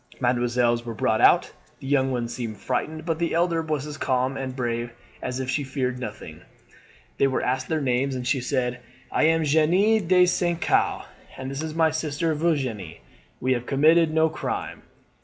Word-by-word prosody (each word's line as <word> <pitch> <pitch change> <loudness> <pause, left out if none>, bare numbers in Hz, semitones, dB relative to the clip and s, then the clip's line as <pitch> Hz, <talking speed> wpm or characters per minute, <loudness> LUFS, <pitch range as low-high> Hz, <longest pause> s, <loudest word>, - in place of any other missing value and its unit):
Mesdemoiselles 120 -1 +1
were 115 -1 -6
brought - - +1
out. - - +5 0.3
The - - -11
young 135 -1 +2
one 120 -2 -1
seemed 115 -3 -5
frightened, 155 +8 -3
but 165 -1 -1
the 170 -1 0
elder 170 -1 +2
was 155 -3 -2
as 150 -1 -8
calm 130 0 0
and 130 -1 -4
brave 120 -1 -2 0.3
as 125 +1 -3
if 130 - -3
she 145 +2 -1
feared 130 -2 -2
nothing. 125 - -8 0.8
They 140 - +5
were 130 - -1
asked 130 +1 -1
their 160 -2 -1
names, 130 0 0
and 125 -1 -4
she 130 +1 +1
said: 125 -1 -1 0.3
"'I - - +1
am 165 0 +3
Jeanne 175 +7 +3
de 180 0 +6
St. 175 -1 0
Caux, - - +1 0.3
and 130 0 -5
this 135 +2 -4
is 160 0 -5
my 160 -1 +3
sister 160 +1 -1
Virginie. 130 - -2 0.4
We 130 +1 +1
have 120 -1 -4
committed 155 +4 +4
no 160 0 +3
crime.' 155 - -4
135 Hz, 185 wpm, -24 LUFS, 125-160 Hz, 0.8 s, de